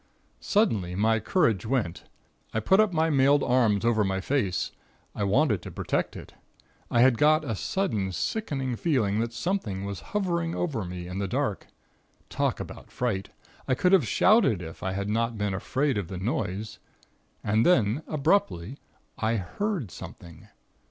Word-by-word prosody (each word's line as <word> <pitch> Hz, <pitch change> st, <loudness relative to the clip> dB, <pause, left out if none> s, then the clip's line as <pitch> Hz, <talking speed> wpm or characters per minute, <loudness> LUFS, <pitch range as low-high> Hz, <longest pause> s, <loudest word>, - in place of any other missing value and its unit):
"Suddenly 110 Hz, -, +1 dB
my 110 Hz, +3 st, +2 dB
courage 115 Hz, -, +1 dB
went. 110 Hz, -8 st, -2 dB, 0.5 s
I -, -, +3 dB
put 190 Hz, -, +3 dB
up 215 Hz, -2 st, +4 dB
my 160 Hz, -1 st, +1 dB
mailed 140 Hz, +1 st, +4 dB
arms 115 Hz, -4 st, +2 dB
over 115 Hz, -2 st, +3 dB
my 95 Hz, -1 st, -1 dB
face. 105 Hz, -4 st, -1 dB, 0.4 s
I 105 Hz, -, -3 dB
wanted 105 Hz, -, +2 dB
to -, -, -8 dB
protect -, -, -2 dB
it. -, -, -10 dB, 0.6 s
I 120 Hz, -, +3 dB
had 125 Hz, -2 st, +5 dB
got 155 Hz, +1 st, +4 dB
a 115 Hz, -, -2 dB
sudden 105 Hz, -, -1 dB
sickening 135 Hz, -, -2 dB
feeling 110 Hz, -11 st, +1 dB
that 115 Hz, +1 st, -1 dB
something 120 Hz, -, -2 dB
was 100 Hz, -1 st, -5 dB, 0.2 s
hovering 170 Hz, -4 st, -1 dB
over 145 Hz, -, -2 dB
me 90 Hz, 0 st, -6 dB
in 90 Hz, +2 st, -5 dB
the 100 Hz, -, -1 dB
dark. -, -, -2 dB, 0.6 s
Talk -, -, 0 dB
about -, -, -8 dB
fright! 110 Hz, -6 st, -2 dB, 0.4 s
I 130 Hz, -, +2 dB
could 180 Hz, +7 st, +2 dB
have 170 Hz, -, +5 dB
shouted 185 Hz, -, +4 dB
if 80 Hz, 0 st, -9 dB
I 95 Hz, -, -2 dB
had 100 Hz, +1 st, -3 dB
not 115 Hz, +2 st, 0 dB
been 105 Hz, -1 st, -1 dB
afraid 130 Hz, +5 st, 0 dB
of 95 Hz, -, -4 dB
the 95 Hz, -, -6 dB
noise.... 105 Hz, +1 st, -3 dB, 0.6 s
And 110 Hz, +2 st, +2 dB
then, 120 Hz, -, +3 dB
abruptly, 145 Hz, -, 0 dB, 0.4 s
I 110 Hz, +1 st, +1 dB
heard 125 Hz, -, -3 dB
something. 85 Hz, +1 st, -11 dB
115 Hz, 160 wpm, -27 LUFS, 100-150 Hz, 0.6 s, had